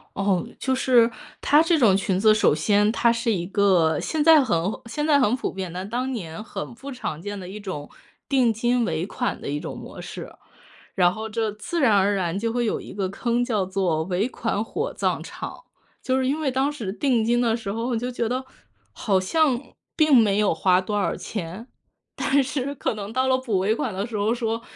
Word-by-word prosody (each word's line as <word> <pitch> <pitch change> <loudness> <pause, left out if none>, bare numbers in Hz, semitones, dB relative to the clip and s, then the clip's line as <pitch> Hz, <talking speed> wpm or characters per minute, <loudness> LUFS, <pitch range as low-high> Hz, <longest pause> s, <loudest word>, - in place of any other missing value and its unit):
哦， 195 -2 +1
就 265 - 0
是 245 -3 +4 0.3
它 295 +2 +5
这 330 0 +3
种 220 -9 +5
裙 190 -1 0
子， 215 +1 +6
首 215 - +3
先 205 +6 +3
它 235 +1 +3
是 230 0 0
一 175 -4 -1
个， 180 -6 +3
现 310 -2 -1
在 315 -3 +7
很 210 -10 +1 0.3
现 295 +6 -3
在 290 -2 +4
很 245 -1 +3
普 - - -3
遍， 185 -3 -5
但 185 +3 -5
当 250 +4 -2
年 190 -3 -6
很 235 - -6
不 270 +4 -9
常 170 - -5
见 205 +1 -5
的 180 - -8
一 205 +3 -7
种， 185 -8 -6 0.4
定 260 -5 +3
金 240 +2 +1
尾 160 +1 -2
款 245 +4 -3
的 - - -7
一 145 +1 -2
种 - - -6
模 - - -9
式。 - - -8 0.6
然 180 -2 +4
后 220 +2 -6
这 220 -1 -1
自 210 +11 -4
然 230 -8 +4
而 200 +1 +3
然 180 -1 -1
就 230 +2 -1
会 240 +1 0
有 220 - -1
一 - - -10
个 195 -1 -2
坑 240 +4 -1
叫 215 -6 0
做 185 -4 0
尾 190 +4 0
款 225 -4 -2
火 435 - -3
葬 - - -1
场。 - - -8 0.4
就 260 0 0
是 260 - 0
因 285 +4 0
为 300 -4 0
当 265 +3 +1
时 225 -10 -5
定 240 0 +1
金 240 +2 +2
的 230 -2 +2
时 210 -4 -5
候， 230 +2 -3
我 245 - 0
就 245 +2 -2
觉 240 -2 -2
得 255 +2 -2 0.5
好 190 - +1
像 265 - +1 0.3
并 310 -3 +4
没 210 -4 +4
有 210 -4 +3
花 180 0 +3
多 205 +2 -2
少 - - 0
钱， 200 +3 -6 0.5
但 280 +1 +2
是 280 0 -3
可 250 - -2
能 205 0 -6
到 260 +1 +1
了 260 0 +3
补 230 -7 -1
尾 210 +4 +1
款 230 -3 -3
的 200 +4 -3
时 225 - -4
候 210 +3 +1
说： 230 -1 -2
225 Hz, 240 characters per minute, -24 LUFS, 195-255 Hz, 0.6 s, 在